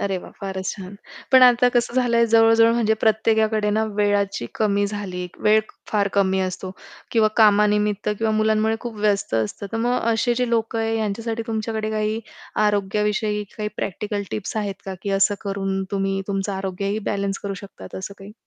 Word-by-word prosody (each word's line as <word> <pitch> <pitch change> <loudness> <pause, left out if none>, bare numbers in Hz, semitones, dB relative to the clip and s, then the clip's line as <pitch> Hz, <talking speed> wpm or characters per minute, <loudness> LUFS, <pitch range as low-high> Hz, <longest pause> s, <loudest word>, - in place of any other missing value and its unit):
अरे 195 -1 -1
वाह! - - -11
फारच 190 -1 -4
छान 190 0 -9 0.4
पण 260 -1 +8
आता 245 0 +6
कसं 240 -1 0
झालं 245 -2 +2
आहे, 235 0 +4
जवळ-जवळ 225 0 +5
म्हणजे 225 -2 +2
प्रत्येकाकडे 220 -1 +2
ना, 220 +1 +1
वेळाची 200 - 0
कमी 205 -2 +1
झाली 195 -3 -5 0.2
वेळ 215 +1 +6 0.3
फार 205 -2 +2
कमी 190 -1 +2
असतो. 185 0 -3 0.4
किंवा 220 -2 +4
कामानिमित्त 210 -1 +3
किंवा 225 -1 +1
मुलांमुळे 215 +1 +2
खूप 235 -2 -6
व्यस्त 205 - 0
असतं. 110 - -2
तर 225 - -1
मग 245 +2 +1
असे 240 +2 +1
जे 250 0 0
लोक 225 0 0
आहे, 225 0 0
यांच्यासाठी 225 +2 -2
तुमच्याकडे 220 -1 -2
काही 215 +1 -1 0.5
आरोग्याविषयी 210 +1 0
काही 210 -1 -2
प्रॅक्टिकल 205 +1 -3
टिप्स 215 +1 -4
आहेत 205 -2 -2
का, 190 - -5
की 200 - -3
असं 205 +1 +4
करून 195 -1 -2
तुम्ही 195 -1 -1
तुमचं 195 0 -1
आरोग्यही 195 +2 -2
बॅलन्स 200 -1 -2
करू 200 -1 -4
शकतात 200 +1 -11
असं 190 +1 -6
काही? 200 +2 -11
210 Hz, 170 wpm, -22 LUFS, 200-225 Hz, 0.5 s, पण